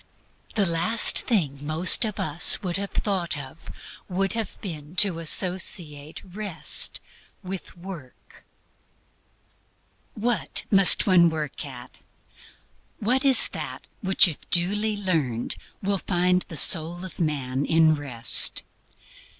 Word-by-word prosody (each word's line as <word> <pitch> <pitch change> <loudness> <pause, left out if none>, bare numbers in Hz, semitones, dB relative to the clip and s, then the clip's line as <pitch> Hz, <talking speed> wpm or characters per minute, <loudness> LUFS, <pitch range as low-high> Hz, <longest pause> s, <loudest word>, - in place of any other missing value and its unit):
The 205 -3 +2
last 170 +7 +3
thing 145 - -1
most 160 +8 +3
of 215 -2 -6
us 155 +6 +3
would 180 -1 -3
have 200 0 -5
thought 185 -7 -3
of 145 +3 -11 0.4
would 195 +1 -2
have 225 -3 -5
been 160 -4 -9
to 190 -4 +4
associate 165 -3 -2
Rest 185 -6 -5 0.4
with 185 -1 -8
Work. 170 -8 -13 1.7
What 235 +1 -2
must 195 -2 +5
one 175 -3 +4
work 155 -3 -5
at? 125 -2 -12 1.0
What 250 +6 -1
is 270 -2 +5
that - - -7 0.2
which 190 -2 +4
if 160 - -9
duly 205 +5 +1
learned 155 - -3 0.3
will 200 0 -1
find 180 0 0
the 160 - -5
soul 170 +4 +5
of 185 - -12
man 140 -5 -2
in 160 0 +3
Rest? 130 -6 +1
175 Hz, 120 wpm, -23 LUFS, 155-195 Hz, 1.7 s, must